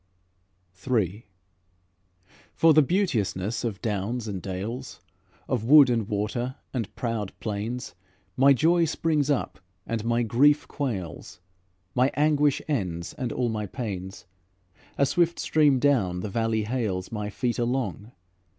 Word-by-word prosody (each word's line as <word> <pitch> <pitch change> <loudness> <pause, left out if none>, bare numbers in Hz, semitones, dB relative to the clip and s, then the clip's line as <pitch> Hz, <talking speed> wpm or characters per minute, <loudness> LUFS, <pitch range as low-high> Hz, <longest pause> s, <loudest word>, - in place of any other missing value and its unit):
III 105 -3 0 1.3
For 165 -1 +5
the 155 - +7
beauteousness 120 - 0
of 105 -6 -4
downs 110 +2 -2
and 95 -3 -4
dales, 105 +8 -5 0.5
Of 125 -4 -1
wood 140 0 +8
and 115 -4 0
water 120 +5 -2 0.2
and 115 -5 -3
proud 115 -5 -3
plains, 110 +1 -4 0.4
My 135 +2 +6
joy 165 +6 +4
springs 155 -2 0
up 145 - -1 0.3
and 115 -2 -3
my 120 +1 +1
grief 140 +7 +3
quails, 100 - -5 0.5
My 125 +2 +3
anguish 145 -1 +2
ends, 90 - -2
and 125 -2 -4
all 125 -2 0
my 105 -2 -3
pains. 95 -5 -6 0.7
A 140 - +4
swift 170 +4 +1
stream 150 -4 +3
down 115 -11 +1
the 105 - -4
valley 115 +1 0
hales 105 -6 -2
My 105 -2 -3
feet 120 +3 -2
along. 120 -2 -2
120 Hz, 130 wpm, -26 LUFS, 105-140 Hz, 1.3 s, wood